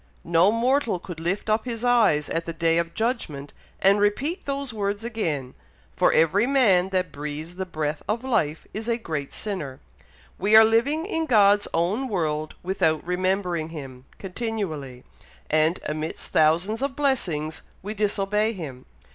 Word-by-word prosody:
No 170 +4 +4
mortal 235 -1 +1
could 175 -2 -9
lift 175 +6 -2
up 215 +1 +1
his 235 -2 -4
eyes 220 -12 +3
at 165 0 -2
the 165 - -4
day 165 +1 +2
of 170 0 -3
judgment, 200 - -3 0.3
and 195 +2 +4
repeat 275 - 0
those 275 -3 -3
words 205 0 -2
again; 160 - -3 0.4
for - - +4
every 190 +8 +3
man 205 -10 +4
that 185 -3 -1
breathes 150 +3 -6
the 190 +1 -5
breath 155 -3 -3
of 230 +3 -1
life 165 - 0
is 215 +2 -5
a 230 - +1
great 155 - -4
sinner. 165 -11 -5 0.6
We 205 +3 +3
are 220 0 +10
living 270 +9 +2
in 325 -5 -2
God's 205 -4 +5
own 195 +11 0
world 155 -7 -2
without 165 -4 0
remembering 180 -2 -1
him, 135 -5 -9
continually; 180 - -4 0.5
and 155 +3 +3
amidst 155 +1 -4
thousands 170 +9 +2
of 275 -1 -2
blessings 175 - -1 0.2
we 210 +2 -4
disobey 210 +1 0
him. 140 - -8
190 Hz, 155 wpm, -25 LUFS, 155-225 Hz, 0.6 s, are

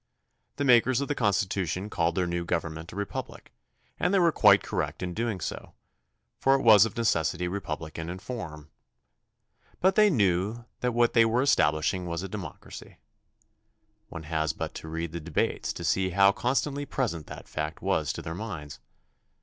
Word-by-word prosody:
The 145 - -2
makers 125 -1 +4
of 140 - -3
the - - +2
Constitution 95 - 0
called 85 -5 0
their 90 - +1
new 85 0 -2
gov 85 -1 0
ernment 80 +2 -8
a - - -11
republic 100 0 -6 0.5
and - - +1
they 200 - +3
were 170 -3 +4
quite 100 -8 +5
correct - - -3
in 90 -1 -3
doing 115 -1 -2
so, 75 - -6 0.6
for 135 0 +4
it 135 - -1
was 110 -2 +8
of 115 +2 -6
necessity 90 -5 +1
republican 80 -3 -5
in 90 - -5
form. 80 -8 -7 1.1
But 190 +1 +4
they 210 +1 +5
knew 105 - +1
that 125 -1 -1
what 120 0 +3
they 115 - +6
were 115 +3 +2
establishing 90 - +2
was 85 +1 -3
a - - -4
democracy. 95 -5 -9 1.1
One 80 - -7
has 80 -1 -1
but - - -5
to - - -8
read 80 0 -4
the 85 - -5
debates 80 0 -1
to - - -7
see 95 0 +1
how 100 +2 +5
constantly 140 +5 -1
present 85 - -2
that - - -10
fact 75 +1 -5
was - - +1
to - - -7
their 80 - -5
minds. 85 -7 -7
95 Hz, 175 wpm, -27 LUFS, 85-115 Hz, 1.1 s, was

